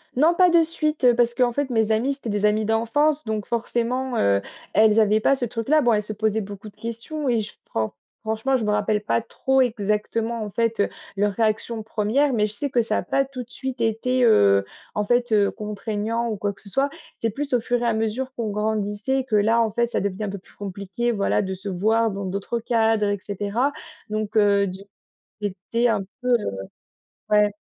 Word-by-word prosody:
Non 310 +7 +4
pas 360 +1 +5
de 340 -1 +5
suite, 310 -3 -2
heu, 245 -1 +6
parce 240 0 +2
qu'en 245 -1 +2
fait 285 +1 -1
mes 225 -3 +1
amies, 235 +6 +1
c'étaient 270 -4 -7
des 205 0 0
amies 215 +1 +2
d'enfance 255 +8 +1
donc 215 -2 -2
forcément, 240 +2 -1
heu, 100 0 +3 0.3
elles 220 0 +5
avaient 215 0 +4
pas 275 +5 +3
ce 255 - -2
truc-là. 240 +7 +1
Bon, 240 -4 +3
elles 210 - +2
se 210 +1 -6
posaient 220 +1 0
beaucoup 205 +1 -8
de 205 - -23
questions 230 +7 -5
et 235 -2 +2
je 210 - -8 0.2
fran 110 -1 -2 0.3
franchement, 220 +5 0
je 230 - -3
me 210 - +1
rappelle 210 0 +1
pas 230 - +1
trop 265 +3 +1
exactement, 225 0 -1
en 210 - -5
fait, 230 0 0
heu, - - +1 0.3
leurs 205 +1 +1
réactions 220 +1 0
1res 225 +6 +1
mais 210 -3 +2
je 210 - -8
sais 285 +7 -3
que 245 -3 +2
ça 225 - -1
a - - -1
pas 275 - +1
tout 265 -2 -7
de 240 - -22
suite 260 0 -5
été, 230 +3 +1
heu, 100 - +5 0.3
en 210 - 0
fait, 240 +1 +1
heu, 205 -2 +4
contraignant 215 +2 -3
ou 220 - -2
quoi 205 0 -2
que 195 - -14
ce - - -14
soit. 275 +7 +1 0.3
C'est 230 - +1
plus 275 +5 -4
au 245 - +3
fur 245 +1 0
et - - 0
à 230 - +2
mesure 225 +4 -2
qu'on 230 -2 -2
grandissait 210 +4 -1
que 250 -4 -1
là, 225 +3 +3
en 225 -2 +1
fait, 235 +3 +1
ça - - 0
devenait 200 +1 -2
un - - -3
peu 200 0 -6
plus - - -23
compliqué, 200 +4 -3
voilà, 200 0 +1
de 190 -2 -3
se 190 +2 -7
voir 220 +5 +2
dans 200 0 -4
d'autres 200 +5 -3
cadres 225 -2 +2
et 205 - -1
cetera. 205 +7 -1 0.4
Donc, 215 0 -3
heu, 200 -2 +4
d 190 +1 -7 0.6
j'ai 205 - 0 0.2
été 235 +1 +3
un 220 -3 +1 0.2
peu, 250 - -3
heu, 215 - +1 0.7
ouais. 210 0 +4
220 Hz, 225 wpm, -23 LUFS, 210-245 Hz, 0.7 s, heu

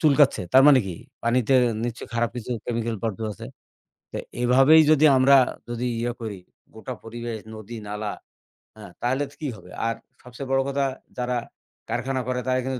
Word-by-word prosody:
চুলকাচ্ছে। 145 - +4
তার 130 - +8
মানে 140 -3 +8
কি? 90 - -4 0.3
পানিতে 120 +2 +2 0.3
নিশ্চয়ই 120 -1 -5
খারাপ 115 0 +1
কিছু 120 0 -6
chemical 115 -1 -2
বর্জ্য 115 -2 -3
আছে। 100 - -9 0.7
তো, - - -3 0.2
এভাবেই 135 +6 +6
যদি 155 -1 +5
আমরা 135 +2 +6 0.3
যদি 120 +1 -3
ইয়া 120 +1 -1
করি 110 -4 -5 0.4
গোটা 110 +3 -7
পরিবেশ, 115 0 -5 0.2
নদী, 110 +2 -8
নালা, 105 0 -3 0.6
হ্যাঁ? 105 -4 -11
তাহলে 130 +4 +1
তো 140 - -19
কি 150 - -2
হবে? 90 -3 -14 0.2
আর 115 - -1 0.3
সবচেয়ে 125 +2 -8
বড় 135 0 +3
কথা 140 0 0 0.3
যারা 125 0 -1 0.5
কারখানা 130 0 -1
করে, 125 0 -1
তারা 130 0 +2
কিন্তু 130 -1 -2
120 Hz, 170 wpm, -24 LUFS, 115-135 Hz, 0.7 s, তার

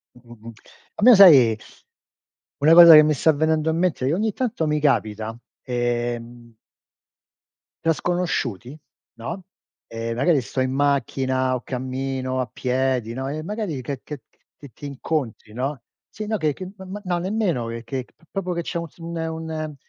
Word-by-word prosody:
Mh-mh-mh. 115 -2 -13 0.4
A - - -5
me, 250 - +9
sai 135 - +7 1.0
una 160 +3 +6
cosa 170 -2 +10
che 155 - +10
mi 155 - +2
sta 160 +3 +3
venendo 155 +1 +1
a - - 0
mente 165 -6 0
e 145 - +1
ogni 215 +3 0
tanto 230 -10 -2
mi 150 0 0
capita. 110 -6 0 0.3
Ehm 120 -1 -3 1.3
tra 165 - +4
sconosciuti, 150 - -2 0.4
no? 170 +11 -6 0.4
Ehm, 115 0 -5
magari 140 +3 +3
sto 130 +2 -4
in 130 0 0
macchina 130 -2 0
o 125 - -4
cammino 130 0 -3
a 125 - -1
piedi, 130 -2 -1
no, 130 +2 -4
e 155 +2 -4
magari 205 - -4
che 135 +1 -5
che 150 -3 -8
che - - -39 0.2
che 145 - -13
ti 145 - -9
incontri, 135 -6 -4
no. 130 +3 -3 0.3
Sì, 215 - -7
no, 215 +1 -1
che 155 -2 0
che 185 -1 -8
ma 190 - -10
ma 200 +3 -7
no, 175 -1 -1
nemmeno 185 - -1 0.2
che 130 -2 -4
p - - -32
proprio 190 -2 -3
che 170 - -2
c'è 170 - -4
un 170 0 -5
sin 165 +2 -14
un 160 0 -2 0.2
un 155 -1 -5
140 Hz, 170 wpm, -22 LUFS, 125-165 Hz, 1.3 s, cosa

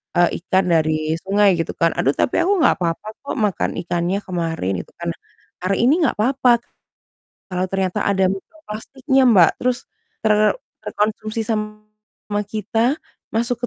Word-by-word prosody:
eee, 175 0 +5 0.2
ikan 190 +1 +2
dari 155 -1 +1
sungai 200 0 +4
gitu 165 - -2
kan. 165 0 +3
"Aduh, 135 - +3
tapi - - +1
aku 385 +3 +2
nggak - - +5
apa-apa 170 +3 -2
kok, 280 - -5
makan 210 -4 0
ikannya 175 +2 -1
kemarin." 165 - -2
Gitu - - -24
kan. - - -3
Nah, - - -21 0.4
hari 195 +2 +1
ini 295 +9 +4
nggak - - +1
papa, 250 +1 +3 0.9
kalau 185 0 -1
ternyata 190 -2 -1
ada 190 -2 +3
mikroplastiknya 265 - -2
Mbak, 185 -7 +6
terus 250 -1 -1 0.4
ter 215 - +5 0.5
terkonsumsi 215 +1 -2
sama 215 -1 -5
kita, 225 +6 0 0.4
masuk 235 +2 -1
210 Hz, 145 wpm, -20 LUFS, 180-235 Hz, 0.9 s, Mbak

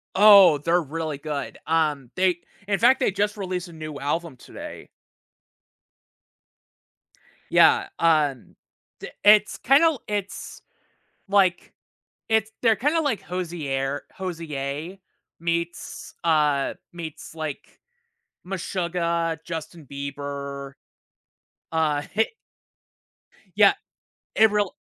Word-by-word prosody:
Oh, 200 -5 +8
they're 170 +4 +2
really 155 0 -4
good. 145 -1 -5
Um, 150 -5 0
they 185 -2 +2 0.3
in 200 -1 0
fact, 245 +3 +5
they 255 - +2
just 205 +2 -1
released 185 -2 -4
a 170 - -13
new 155 -2 -7
album 155 0 -3
today. - - -10 2.6
Yeah, - - +5
um, 150 -6 +1 0.4
d - - -7
it's 210 0 +6
kinda, 275 +5 +4
l 320 -7 +1
it's 205 -1 -5 0.7
like, 190 -3 +2 0.6
it's 220 -1 +2
they're 225 -2 +4
kinda 295 +8 +1
like 280 -9 -1
Hozier 145 -6 -3
Hozier 160 -2 -5 0.4
meets, 170 +1 -4
uh, 150 -4 +2 0.2
meets, 165 -3 -8
like, 155 -3 -7 0.7
Meshuggah, 170 -3 -2
Justin 165 -2 -7
Bieber, 140 0 -6 1.0
uh, 155 -3 +1
heh 220 +2 +3 1.3
Yeah, - - +7 0.6
it 220 0 +5
real 205 -2 0
170 Hz, 100 wpm, -24 LUFS, 150-195 Hz, 2.6 s, Oh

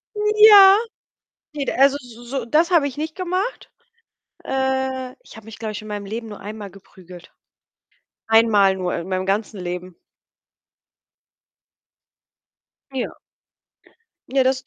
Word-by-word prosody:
Ja. 420 -2 +7 0.8
Ne, 285 -2 -3
d - - 0
also, 275 +1 +4
s 245 -4 -14 0.2
so 270 -3 -3
das 315 +9 +2
habe 330 -5 +3
ich 260 - -11
nicht 310 +1 -5
gemacht. 370 +5 -4 0.7
Äh, 265 -1 -2
ich - - -15
habe 220 -1 -14
mich, 225 - -11
glaube 220 -1 -5
ich, 210 - -7
in 215 - -11
meinem 205 -1 -6
Leben 225 +2 -6
nur 205 - -10
einmal 205 -1 -8
geprügelt. 180 -2 -15 1.0
Einmal 215 -4 +4
nur 180 -1 -3
in 170 +2 -5
meinem 185 0 -2
ganzen 200 0 -2
Leben. 180 0 -6 3.0
Ja. 260 -2 -5 1.1
Ja, 265 0 +2
das 260 0 0
235 Hz, 130 wpm, -21 LUFS, 200-280 Hz, 3.0 s, Ja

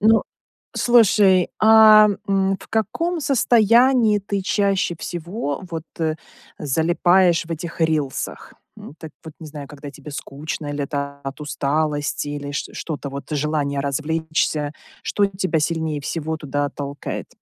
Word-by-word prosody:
Ну, 220 +1 +5 0.5
слушай, 205 -6 +4
а, 215 -1 +8 0.2
м, 195 0 +2
в - - -14
каком 330 - -1
состоянии 235 -3 +4
ты 200 -1 -3
чаще 195 -3 +1
всего 175 - -4
вот, 165 -1 -5
э, 160 -1 0 0.4
залипаешь 170 +4 +2
в - - -16
этих 165 +1 -6
рилсах? 155 -4 -2 0.2
М, - - -11
так 160 -2 -10
вот 160 -1 -10
не 160 - -8
знаю, 145 -2 -8
когда 145 0 -9
тебе 145 +1 -11
скучно, 150 +2 -6
или 145 -1 -2
это 140 -1 -4
от 135 +2 -6
усталости, 145 +1 -1
или 145 -1 -5
чт - - -4
что 155 -3 -4
то, 140 0 -7
вот, 140 0 -7
желание 145 -1 -1
развлечься, 155 +1 -1 0.3
что 205 -1 +1
тебя 185 -4 -1
сильнее 160 -1 -1
всего 160 +2 -3
туда 145 -1 -2
толкает? 140 0 -6
160 Hz, 140 wpm, -21 LUFS, 145-195 Hz, 0.5 s, а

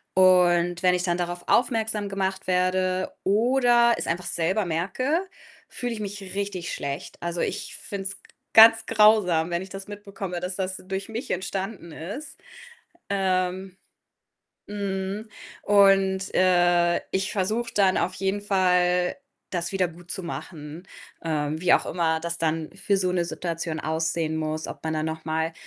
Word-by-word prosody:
und 175 -2 +4
wenn 180 -1 +4
ich 180 - -1
dann 175 -1 0
darauf 175 0 -3
aufmerksam 220 -4 +1
gemacht 190 -1 -2
werde 185 0 +1
oder 240 +3 +4
es - - -4
einfach 175 +2 -2
selber 185 +6 0
merke, 195 - 0 0.5
fühle 245 -1 -4
ich 225 - -6
mich 205 -1 -5
richtig 200 -3 -3
schlecht. 140 0 -5
Also, 170 0 -2
ich - - -3
finde 195 -1 -7
es 200 - -6
g - - -22 0.2
ganz 225 0 +8
grausam, 210 -7 +4
wenn 170 - 0
ich 190 - -8
das 195 +1 -8
mitbekomme, 200 -3 -6
dass 180 +1 -4
das 185 -1 -3
durch 195 +2 -4
mich 225 +3 -5
entstanden 190 -1 -4
ist. 205 - -8 0.7
Ähm 185 -1 -1 0.9
mhm. 200 +1 -4 0.3
Und, 195 -1 +4
äh, 175 -1 +4
ich 190 +1 -1
versuche 220 +4 -1
dann 195 -2 +3
auf 185 - 0
jeden 195 +2 -1
Fall, 180 -2 +2 0.3
das 175 0 -3
wiedergutzumachen. 170 -3 -5 0.4
Ähm, 155 -1 -1
wie 180 - +3
auch - - +1
immer 160 -2 0
das 170 +1 -3
dann 160 -1 -1
für 200 - 0
so 185 -1 0
'ne 175 -1 +1
Situation 165 -2 -4
aussehen 160 0 -1
muss. 155 0 -3
Ob - - -9
man 160 - -1
dann 155 0 -1
noch 160 0 -5
mal 160 +1 -1
185 Hz, 150 wpm, -25 LUFS, 170-200 Hz, 0.9 s, ganz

